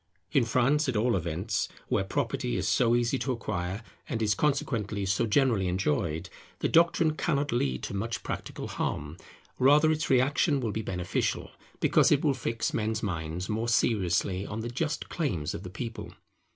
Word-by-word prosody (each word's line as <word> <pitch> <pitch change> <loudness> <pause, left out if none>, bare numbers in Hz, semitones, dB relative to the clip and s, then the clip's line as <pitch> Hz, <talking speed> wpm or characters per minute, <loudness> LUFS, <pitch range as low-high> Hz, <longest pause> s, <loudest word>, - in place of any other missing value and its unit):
In - - +3
France, 130 +5 +2
at 125 - -1
all 115 +2 +2
events, 90 +4 -1 0.2
where - - +1
property 80 -9 -1
is - - -1
so 120 -1 +3
easy 120 +2 +1
to 135 - -1
acquire 100 -3 -3 0.3
and 115 - -1
is 105 -2 +2
consequently 115 -8 0
so 100 +5 +1
generally 110 -5 +2
enjoyed, 85 -2 0 0.3
the - - 0
doctrine 165 -1 +4
cannot 145 -3 0
lead 65 - 0
to - - -4
much 110 +3 -3
practical - - -5
harm; 75 +2 -3 0.4
rather 150 +4 +6
its 155 0 -1
reaction 140 +3 +3
will 115 -4 -1
be 110 - -2
beneficial, 90 -4 -2 0.3
because - - +4
it 150 +1 +3
will 145 - +4
fix 115 -3 -2
men's 110 0 -1
minds 85 -1 -3
more 110 +2 -1
seriously 95 -4 +1
on 105 +2 -5
the 120 - -4
just 150 +5 -2
claims 90 - -2
of - - -5
the 90 - -7
People. 115 +4 -6
110 Hz, 170 wpm, -28 LUFS, 95-130 Hz, 0.4 s, rather